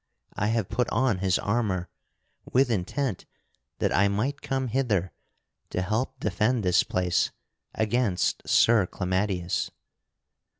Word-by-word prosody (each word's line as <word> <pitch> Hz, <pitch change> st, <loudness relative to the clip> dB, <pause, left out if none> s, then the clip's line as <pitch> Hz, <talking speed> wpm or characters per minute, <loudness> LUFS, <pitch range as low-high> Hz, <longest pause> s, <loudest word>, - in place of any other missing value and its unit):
I 105 Hz, -, -1 dB
have 110 Hz, -3 st, 0 dB
put 120 Hz, +2 st, -1 dB
on 115 Hz, -4 st, +1 dB
his 95 Hz, -1 st, +2 dB
armor 100 Hz, -5 st, -1 dB, 0.6 s
with 130 Hz, -1 st, +3 dB
intent 110 Hz, +2 st, -2 dB, 0.5 s
that -, -, 0 dB
I 100 Hz, -, +4 dB
might 110 Hz, +9 st, -1 dB
come 135 Hz, -2 st, -2 dB
hither 110 Hz, -8 st, 0 dB, 0.6 s
to 90 Hz, -, -2 dB
help 110 Hz, +7 st, -2 dB
defend 110 Hz, +4 st, +1 dB
this 90 Hz, -1 st, +4 dB
place 90 Hz, -1 st, +1 dB, 0.5 s
against 110 Hz, -4 st, +1 dB
Sir 110 Hz, -5 st, +5 dB
Clamadius." 95 Hz, -1 st, -1 dB
105 Hz, 120 wpm, -27 LUFS, 95-120 Hz, 0.6 s, Sir